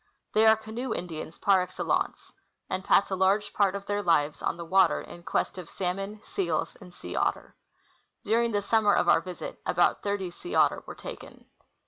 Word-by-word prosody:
They 220 +1 +5
are 220 - +8
canoe 220 +4 -4
Indians 165 -2 -6
jjar 195 -2 +4
excellence, 180 - -2 0.4
and 185 0 -2
pass 200 - +3
a - - +1
large 195 +2 +2
part 200 -2 +2
of 200 0 -6
their 205 0 -1
lives 150 -5 +1
on - - -1
the 170 - -6
water 185 0 +4
in 175 - -10
quest 170 +2 -2
of 175 - -9
salmon, 195 +3 -4
seals, 170 -5 -2
and 180 -2 -12
sea 90 - -8
otter. - - -1 0.7
During 230 +2 +2
the 205 -1 0
sum 220 +1 +2
mer 205 - +5
of - - +2
our - - +5
visit, 180 0 -7
about 175 0 +2
thirty 200 -3 -2
sea 350 - -7
otter - - +3
were - - -7
taken. - - -10
195 Hz, 190 wpm, -28 LUFS, 175-205 Hz, 0.7 s, are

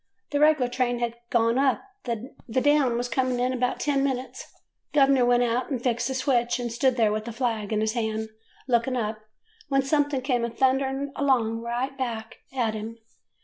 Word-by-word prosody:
The 290 - +1
reg'lar 300 -4 +4
train 245 -1 0
had 235 -1 -1 0.2
gone 230 +1 +2
up, 270 -1 +2 0.2
the 235 +1 -4 0.3
down 280 -4 +3
was 245 +1 -1
coming 255 +1 0
in 250 +1 +1
about 250 0 -1
ten 280 -2 +1
minutes. 265 -2 -3 0.4
Gov 275 -2 +6
'ner 255 -3 +4
went 245 0 +4
out 240 +1 0
and 265 -4 -1
fixed 235 -1 0
the 265 - -3
switch, 245 -3 +1
and 240 -1 -3
stood 255 +2 +1
there 220 -3 +3
with 215 0 -2
the 235 - -5
flag 225 -3 -2
in 215 -1 +1
his 220 0 0
hand 220 -2 -2 0.4
looking 250 +1 +1
up, 215 -2 -2 0.5
when 275 -1 +2
something 285 -1 +1
come 250 -3 +1
a 235 - 0
thundering 270 +3 0
along 235 -5 +1
right 240 +4 -3
back 225 -3 -4
of 235 -5 0
him. 220 +1 -6
245 Hz, 190 wpm, -26 LUFS, 230-265 Hz, 0.5 s, Gov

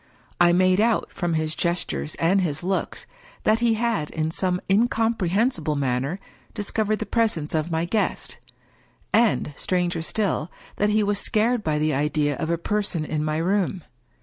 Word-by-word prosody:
I 175 0 +6
made 185 +2 +4
out, 230 0 +2
from 175 -3 -1
his 155 0 0
gestures 75 - -2
and 185 +4 +2
his 155 -3 -2
looks, 190 +1 -2 0.4
that 220 +1 +3
he 235 -1 +3
had, 220 -9 0
in 160 0 -2
some 180 +1 0
incomprehensible 215 - +1
manner, 135 +5 -1 0.4
dis 210 -3 -3
covered 215 -1 +1
the 220 - -4
presence 205 -9 0
of 160 +1 0
my 165 0 0
guest; 210 +5 -1 0.7
and, 225 -9 +2
stranger 175 -1 -1
still, 180 -2 -1 0.3
that 210 - +2
he 215 0 +3
was 205 0 0
scared 220 +3 +1
by 155 -3 0
the 155 0 +1
idea 145 +1 +1
of 160 - -3
a 170 - +1
person 200 -3 -1
in 150 0 -2
my 155 0 -1
room. 185 +1 0
180 Hz, 165 wpm, -24 LUFS, 155-210 Hz, 0.7 s, I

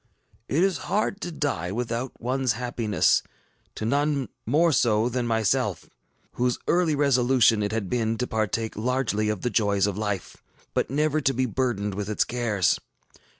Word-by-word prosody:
ŌĆ£It 155 - +2
is 195 -2 +2
hard 205 +1 0
to 175 - -4
die 140 - -2
without 120 +3 -2
oneŌĆÖs 130 0 0
happiness; 115 -3 +1 0.5
to 110 - -4
none 140 +2 0 0.2
more 160 +7 +4
so 115 -5 +3
than 125 -1 -2
myself, 110 -3 0 0.4
whose 125 0 0
early 170 -3 +2
resolution 125 -5 +3
it 105 0 -1
had 110 -3 -2
been 115 0 0
to 125 - -1
partake 110 0 -2
largely 110 -2 0
of 105 -3 -2
the 125 - -1
joys 100 -2 +2
of 100 0 -2
life, 105 -3 -3 0.4
but - - 0
never 150 +3 +1
to 135 -2 +1
be 130 +1 +1
burdened 115 -5 -1
with 100 +1 -4
its 105 - +2
cares. 115 -7 0
120 Hz, 160 wpm, -25 LUFS, 105-135 Hz, 0.5 s, more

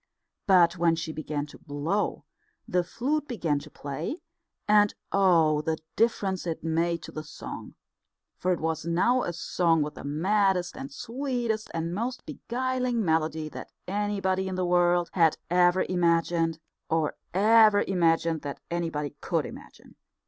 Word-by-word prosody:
But 175 -2 +5
when 170 -1 +4
she 160 -1 -4
began 150 -2 -3
to 150 - -14
blow, 155 +8 -2 0.4
the 180 -1 +1
flute 290 - -2
began 170 - -1
to - - -12
play; 150 - -5 0.5
and 210 -1 +4 0.2
oh, 165 -6 +4
the 160 +1 -1 0.2
difference 195 -5 +1
it 165 -2 -3
made 165 +1 0
to - - -8
the 155 - -5
song! 155 0 -9 0.6
For 185 - -1
it 175 - 0
was 160 0 -2
now 180 +10 +2
a 175 - -2
song 165 -2 +1
with 150 0 -5
the - - -10
maddest 185 +4 +1
and 135 - -7
sweetest 235 - -3
and 165 +1 -3
most 240 +6 -3
beguiling 250 -2 -2
melody 160 -1 0
that - - -9 0.2
anybody 195 -1 0
in 190 - -3
the 185 0 0
world 175 0 +2
had 165 -4 +4
ever 180 +1 +4
imagined, 170 -2 +1 0.3
or 160 -2 +1 0.2
ever 215 +1 +5
imagined 165 -3 +1
that 140 -1 -6
anybody 165 -4 -2
could 165 -5 0
imagine. - - -12
175 Hz, 150 wpm, -27 LUFS, 160-205 Hz, 0.6 s, But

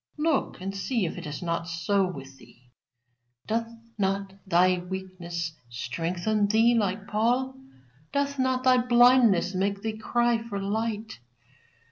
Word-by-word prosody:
Look 300 - 0
and 195 +2 -5
see 220 +1 -1
if 165 - -4
it - - -7
is 150 +3 -6
not 170 -1 -2
so 175 +4 +1
with 135 -6 -9
thee? 125 0 -20 0.7
Doth 230 +1 -1 0.3
not 195 0 -1
thy 180 0 +4
weakness 175 -2 -5 0.2
strengthen 170 - -1
thee 225 +3 +4
like 205 -3 0
Paul? 240 +5 +1 0.6
Doth 280 0 -1
not 260 0 +1
thy 255 -1 +5
blindness 240 -6 +5
make 200 +1 -1
thee 220 -1 -3
cry 240 +1 +1
for 225 -3 -5
light? 215 - -3
200 Hz, 135 wpm, -27 LUFS, 180-235 Hz, 0.7 s, thy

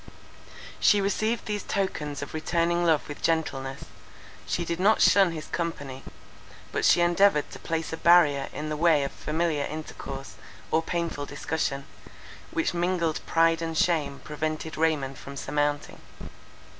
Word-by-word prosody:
She 205 - +5
received 215 +3 0
these 210 -1 -2
tokens 150 -8 -2
of - - -8
returning 170 +2 0
love 160 -3 +2
with 145 - -8
gentleness; 135 -5 -1 0.6
she 175 - -1
did 170 +1 -3
not 205 +4 +4
shun 195 -3 +5
his 155 -2 -6
company; 145 -6 -4 0.7
but - - 0
she - - +5
endeavoured 175 -2 +3
to - - -9
place 160 0 -3
a - - -3
barrier 155 -6 +5
in 155 0 -5
the 155 - -2
way 160 -3 +4
of 140 - -3
familiar 155 -2 -1
intercourse 155 0 -7 0.4
or 160 - +3
painful 165 -4 -3
discussion, 145 -1 -2 0.6
which 330 - -1
mingled 175 -2 0
pride 165 0 +3
and 165 -1 -3
shame 155 -6 +1
prevented 155 +1 -4
Raymond 150 -4 0
from 140 0 -9
surmounting. 145 +1 -2
160 Hz, 145 wpm, -27 LUFS, 145-175 Hz, 0.7 s, She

